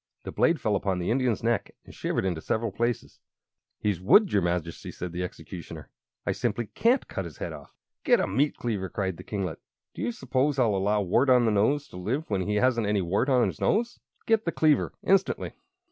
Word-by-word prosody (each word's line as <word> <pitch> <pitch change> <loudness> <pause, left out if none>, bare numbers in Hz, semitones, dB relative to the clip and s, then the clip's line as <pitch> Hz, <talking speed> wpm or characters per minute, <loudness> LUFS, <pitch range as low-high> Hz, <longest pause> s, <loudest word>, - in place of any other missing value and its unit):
The - - -6
blade 165 -2 +2
fell 105 -2 +1
upon 95 -2 0
the 90 +3 -1
Indian's 125 -3 +1
neck 115 -3 0
and - - -13
shivered - - -2
into 85 -4 -1
several 110 +4 -1
pieces. 120 +3 -2 0.6
"He's 100 -5 -1
wood, 195 - +5
your 100 - +4
Majesty," 85 -1 -2
said 90 -1 -6
the 90 +1 -4
Executioner. 90 -1 -8 0.3
"I - - +1
simply 120 - -1
can't 245 +3 +2
cut 95 - -4
his 80 -5 -9
head - - -5
off." - - -12 0.3
"Get - - +4
a - - +2
meat 145 +2 0
cleaver!" 100 -6 -2
cried 95 -1 -2
the - - -9
kinglet. 95 -6 -4 0.3
"Do - - -7
you 115 +3 0
suppose 135 +4 0
I'll 120 -5 +3
allow 100 +2 +1
Wart 120 +9 +2
on 125 -2 +5
the 110 - +3
Nose 125 +8 +2
to - - -10
live 125 - -2
when 100 -2 +1
he 105 - 0
hasn't 115 -1 +2
any 105 -2 +1
wart 100 +10 0
on 125 -3 +4
his - - -4
nose? 235 +3 +1 0.3
Get 225 -1 +3
the 170 - -1
cleaver 155 -3 +2
instantly!" 195 0 +1
110 Hz, 210 wpm, -27 LUFS, 95-130 Hz, 0.6 s, wood